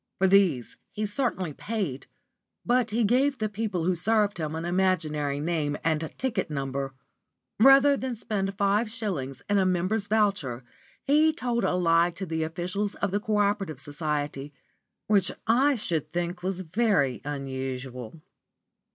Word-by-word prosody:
For 190 Hz, -, +2 dB
these 185 Hz, -10 st, +3 dB
he 215 Hz, -, -3 dB
certainly 205 Hz, -, -1 dB
paid, 190 Hz, -, -4 dB, 0.6 s
but 245 Hz, 0 st, +2 dB
he 230 Hz, +2 st, +1 dB
gave 265 Hz, +6 st, +2 dB
the 215 Hz, -2 st, -1 dB
people 205 Hz, -4 st, -2 dB
who 185 Hz, +2 st, +2 dB
served 205 Hz, +2 st, +1 dB
him 155 Hz, -1 st, -3 dB
an 165 Hz, +1 st, -4 dB
imaginary 160 Hz, -6 st, 0 dB
name 150 Hz, -2 st, -1 dB
and 160 Hz, -1 st, 0 dB
ticket 260 Hz, -9 st, -1 dB
number. 135 Hz, -2 st, -3 dB, 0.6 s
Rather 270 Hz, +3 st, +7 dB
than 260 Hz, -2 st, -3 dB
spend 195 Hz, -3 st, -3 dB
five 205 Hz, +2 st, +2 dB
shillings 175 Hz, -, -4 dB
in 205 Hz, 0 st, +2 dB
a -, -, +3 dB
member's 185 Hz, +4 st, 0 dB
voucher, 195 Hz, -, 0 dB, 0.4 s
he 305 Hz, +3 st, +4 dB
told 245 Hz, -6 st, -2 dB
a -, -, +1 dB
lie 170 Hz, -1 st, +3 dB
to 190 Hz, -, -4 dB
the 160 Hz, -2 st, -2 dB
officials 180 Hz, +6 st, -2 dB
of 200 Hz, -, -2 dB
the 205 Hz, -, +1 dB
Co 215 Hz, 0 st, -1 dB
operative 200 Hz, -8 st, 0 dB
Society; 145 Hz, -1 st, -3 dB, 0.5 s
which 205 Hz, -2 st, +2 dB
I 265 Hz, +6 st, +4 dB
should 160 Hz, -, -2 dB
think 175 Hz, +1 st, -3 dB
was 185 Hz, 0 st, -2 dB
very 180 Hz, -, +1 dB
unusual. 130 Hz, -1 st, -5 dB
185 Hz, 150 wpm, -27 LUFS, 150-215 Hz, 0.6 s, Rather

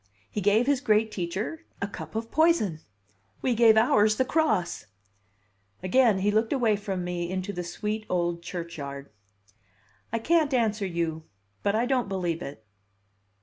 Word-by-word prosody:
He 210 Hz, -, -3 dB
gave 205 Hz, +5 st, +3 dB
his 280 Hz, -1 st, +2 dB
great 215 Hz, -2 st, +2 dB
teacher 195 Hz, -, -4 dB, 0.2 s
a 200 Hz, -, -2 dB
cup 205 Hz, -, -9 dB
of 225 Hz, +1 st, -3 dB
poison. 315 Hz, -, +3 dB, 0.6 s
We 255 Hz, -, +2 dB
gave 225 Hz, -1 st, +6 dB
ours 215 Hz, -2 st, +4 dB
the 260 Hz, -, +1 dB
cross." 250 Hz, -, 0 dB, 1.0 s
Again 225 Hz, +2 st, +4 dB
he 200 Hz, +2 st, +1 dB
looked 220 Hz, +2 st, +1 dB
away 235 Hz, -6 st, +2 dB
from 195 Hz, -3 st, -4 dB
me 175 Hz, -1 st, -3 dB
into 185 Hz, +2 st, -3 dB
the 180 Hz, -1 st, -4 dB
sweet 210 Hz, +5 st, -4 dB
old 175 Hz, -1 st, 0 dB
churchyard. 145 Hz, -, -7 dB, 1.0 s
"I 230 Hz, -, 0 dB
can't 305 Hz, +3 st, +2 dB
answer 215 Hz, -4 st, +1 dB
you, 165 Hz, -2 st, -3 dB, 0.4 s
but 200 Hz, -, +1 dB
I 230 Hz, +2 st, +2 dB
don't 250 Hz, -4 st, 0 dB
believe 175 Hz, -3 st, -2 dB
it." 140 Hz, -6 st, -8 dB
205 Hz, 150 wpm, -27 LUFS, 175-230 Hz, 1.0 s, gave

